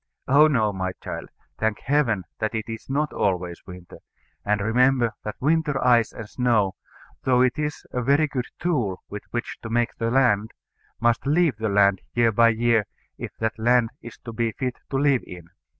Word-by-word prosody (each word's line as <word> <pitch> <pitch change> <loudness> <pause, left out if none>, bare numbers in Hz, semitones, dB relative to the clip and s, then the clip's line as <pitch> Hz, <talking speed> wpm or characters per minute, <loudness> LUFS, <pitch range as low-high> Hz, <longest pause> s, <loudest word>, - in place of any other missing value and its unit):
Oh 145 +3 +6
no, 110 -8 +1
my 95 -1 -3
child: - - -7 0.3
thank 110 -1 -1
Heaven 130 -9 +1 0.2
that 110 +1 -2
it 110 - -2
is 115 +1 -8
not 150 +3 -1
always 90 -3 -1
winter; 90 -1 -11 0.4
and 105 0 +1
remember 120 +3 +2
that 105 - -5
winter 150 -1 +1
ice 120 -3 +4
and 110 - -8
snow, 110 -5 +1 0.5
though 125 -1 +3
it 130 +3 +1
is 150 0 -3
a 125 - -2
very 140 +5 +3
good 130 -4 -3
tool 125 - -1
with 105 - -6
which 120 -1 -4
to 110 - -7
make 120 +1 0
the 115 0 -1
land, 115 -4 +2 0.5
must 120 +2 +1
leave 155 -4 +2
the 110 0 -1
land 100 -1 +3
year 120 -1 +4
by 115 +2 +5
year 115 -2 +2 0.3
if - - -5
that 110 0 -2
land 120 0 +3
is 120 - -10
to 115 - -6
be 115 -1 -1
fit 130 -2 -4
to 135 - -1
live 140 -2 +3
in. 85 -2 -11
115 Hz, 185 wpm, -24 LUFS, 105-130 Hz, 0.5 s, Oh